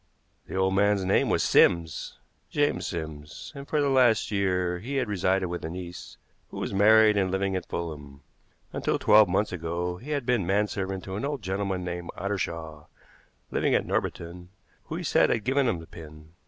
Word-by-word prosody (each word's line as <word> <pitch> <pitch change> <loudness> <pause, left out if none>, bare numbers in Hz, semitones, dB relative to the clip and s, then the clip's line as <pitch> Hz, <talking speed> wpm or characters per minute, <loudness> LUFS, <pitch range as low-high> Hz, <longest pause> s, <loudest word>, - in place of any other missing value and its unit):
The - - -7
old 95 0 +2
man's 100 0 +2
name 95 - +2
was - - +2
Sims 80 -3 +2 0.3
James 145 0 0
Sims 80 -3 -7
and 140 -1 -9
for 150 - 0
the 145 - +2
last 125 -6 +3
year 90 -3 0
he 130 +9 -5
had 130 -3 0
resided 95 -1 +1
with 90 0 -5
a 80 - -3
niece, 90 +1 -8 0.3
who - - -9
was - - -3
married 105 +1 +6
and 95 -2 +2
living 95 0 -1
at 90 - -4
Fulham. 75 -4 -6 0.5
Until - - 0
twelve 105 -2 +6
months 100 +4 +1
ago 85 +1 -3
he 125 +10 -11
had 145 -4 -1
been 125 -5 +2
manservant 95 -1 -1
to 95 0 -5
an 105 - -4
old 140 -4 -3
gentleman 95 0 -2
named 90 -1 -5
Ottershaw, 85 -6 -4 0.7
living - - +1
at - - +1
Norbiton, 90 +1 -3 0.4
who - - -5
he - - -4
said - - +3
had 115 - 0
given 135 +3 +2
him 105 - +1
the 80 - -10
pin. 80 -1 -12
95 Hz, 185 wpm, -27 LUFS, 85-105 Hz, 0.7 s, married